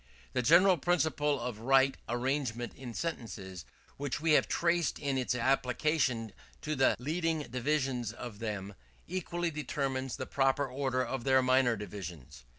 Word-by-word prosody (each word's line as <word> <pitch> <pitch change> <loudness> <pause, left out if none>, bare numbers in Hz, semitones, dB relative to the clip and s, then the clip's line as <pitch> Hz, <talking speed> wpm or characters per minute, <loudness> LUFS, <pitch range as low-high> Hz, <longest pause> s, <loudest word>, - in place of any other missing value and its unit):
The 130 - +1
general 175 +8 +6
principle 150 -3 +1
of 120 -3 -4
right 135 +3 +4
arrangement 120 -1 -1
in 125 -3 -9
sentences, 95 - -5 0.3
which 140 -1 -3
we 160 +1 +1
have 150 - +5
traced 170 -3 +1
in 140 -2 -1
its 130 -1 0
application 125 -2 +1 0.3
to 155 0 -1
the 130 -1 +4
leading 160 +3 -1
divisions 130 -2 -1
of 120 -3 -8
them, 105 -3 -4 0.3
equally 175 -1 -2
determines 135 -4 -2
the 130 - -4
proper 135 +1 +1
order 130 -1 -1
of 135 -3 -4
their 130 0 +4
minor 130 -2 +4
divisions. 85 - -8
130 Hz, 145 wpm, -31 LUFS, 120-150 Hz, 0.3 s, general